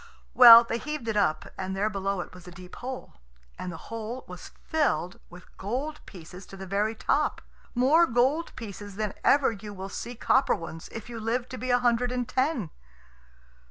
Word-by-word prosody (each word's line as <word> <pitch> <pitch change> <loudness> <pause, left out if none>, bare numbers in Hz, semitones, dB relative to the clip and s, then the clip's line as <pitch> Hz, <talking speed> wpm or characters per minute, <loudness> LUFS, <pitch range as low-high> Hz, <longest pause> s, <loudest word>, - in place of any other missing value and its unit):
Well, 235 -2 +11
they 230 0 -3
heaved 300 -4 -5
it 220 - -1
up, 155 -7 +1
and 190 0 -3
there 200 +2 +1
below 195 -2 -2
it - - -10
was 180 -1 -13
a - - -9
deep 180 0 -12
hole, 255 +1 -7 0.5
and 180 - -4
the 165 - -8
hole 230 +3 -5
was 180 0 -9 0.2
filled 195 - 0
with 180 +1 -15
gold 265 +10 -4
pieces 180 +1 -11
to 195 - -11
the 190 - -7
very 205 +4 -1
top; - - 0 0.4
more 295 +8 +5
gold 260 +8 +1
pieces 205 -2 -8
than 215 -1 -2
ever 280 -3 +4
you 205 -1 -9
will 190 +1 -7
see 240 +4 -6
copper 260 +3 +2
ones 165 0 -8
if 225 - -8
you 235 -1 -7
live 235 +3 -1
to 255 - -7
be 255 - -4
a 245 - +5
hundred 245 0 +1
and 250 -1 -2
ten. 255 - -1
225 Hz, 195 wpm, -27 LUFS, 190-250 Hz, 0.5 s, Well